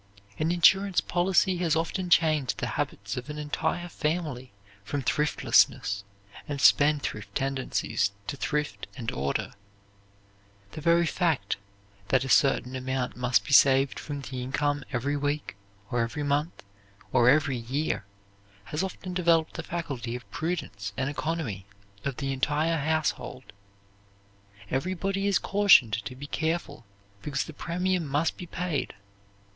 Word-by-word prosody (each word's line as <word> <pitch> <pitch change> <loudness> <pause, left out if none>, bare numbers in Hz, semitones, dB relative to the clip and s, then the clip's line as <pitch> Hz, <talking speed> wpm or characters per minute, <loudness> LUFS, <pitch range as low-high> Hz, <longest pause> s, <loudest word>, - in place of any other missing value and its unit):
An 160 +2 +1
insurance 190 +2 +5
policy 180 +1 +2
has 170 -3 +1
often 175 +3 -1
changed 155 -6 +3
the - - -2
habits 100 +2 -3
of 125 +3 -6
an 150 - -5
entire 150 +4 -2
family 150 -6 -3 0.3
from 135 +7 -3
thriftlessness 100 - +2 0.4
and 145 -1 -3
spendthrift 140 -4 +3
tendencies 135 -6 0
to 145 - -4
thrift 150 +1 -2
and 115 -3 -3
order. 70 +2 -2 1.2
The 155 - -7
very 170 +2 +4
fact 160 - 0 0.5
that 130 +3 +3
a 135 - -5
certain 130 -2 +3
amount 130 -1 -2
must 125 0 +2
be 145 - -2
saved 135 0 +5
from 145 -2 -5
the 130 -2 -6
income 145 +3 -1
every 140 +3 -1
week, 145 -2 -2 0.4
or 120 - +1
every 135 +6 -2
month, 145 +3 -1 0.5
or 120 0 +5
every 140 -2 +3
year, 130 +3 -2 0.6
has 150 - -3
often 185 -1 -5
developed 170 -3 +2
the - - -4
faculty 135 -9 -4
of 125 -4 -8
prudence 105 - -3
and 135 +2 -1
economy 135 - -3 0.4
of 140 -2 -3
the 135 -2 -2
entire 150 +5 +1
household. 150 -3 -2 1.2
Everybody 185 +7 -1
is 200 -3 +4
cautioned 195 - +5
to 125 - -6
be 140 +3 -8
careful 160 +3 -2 0.4
because 140 +4 -1
the 160 - -9
premium 180 +1 -1
must 145 +4 0
be 180 - -8
paid. 170 -9 -3
145 Hz, 135 wpm, -27 LUFS, 130-165 Hz, 1.2 s, insurance